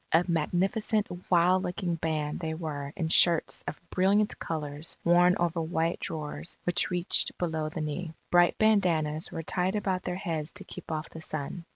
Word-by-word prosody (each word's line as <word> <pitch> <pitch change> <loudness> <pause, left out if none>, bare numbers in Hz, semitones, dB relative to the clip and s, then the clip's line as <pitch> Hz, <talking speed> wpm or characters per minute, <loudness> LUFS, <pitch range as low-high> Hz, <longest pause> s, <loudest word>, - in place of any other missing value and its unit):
A 165 +2 +4
magnificent 195 +6 +1 0.2
wild 180 +1 +4
looking 180 -1 -2
band 155 -2 -2
they 160 -2 -3
were 145 -4 -5
in 165 -3 -1
shirts 170 0 +4
of 150 - -4
brilliant 200 +3 +2
colours 150 -1 -4
worn 175 +1 +5
over 170 -1 0
white 165 +1 -1
drawers 155 +1 -4
which 175 0 +1
reached 175 -1 +1
below 160 -3 -1
the 160 +1 -5
knee. 160 +2 -4 0.2
Bright 175 0 +5
bandanas 170 -8 +2
were 165 - -5
tied 180 +4 -1
about 190 -3 0
their 180 - -3
heads 165 -5 -3
to 205 - -8
keep 180 -3 -9
off 155 0 -4
the 160 - -9
sun. 155 +2 -5
170 Hz, 170 wpm, -29 LUFS, 160-180 Hz, 0.2 s, worn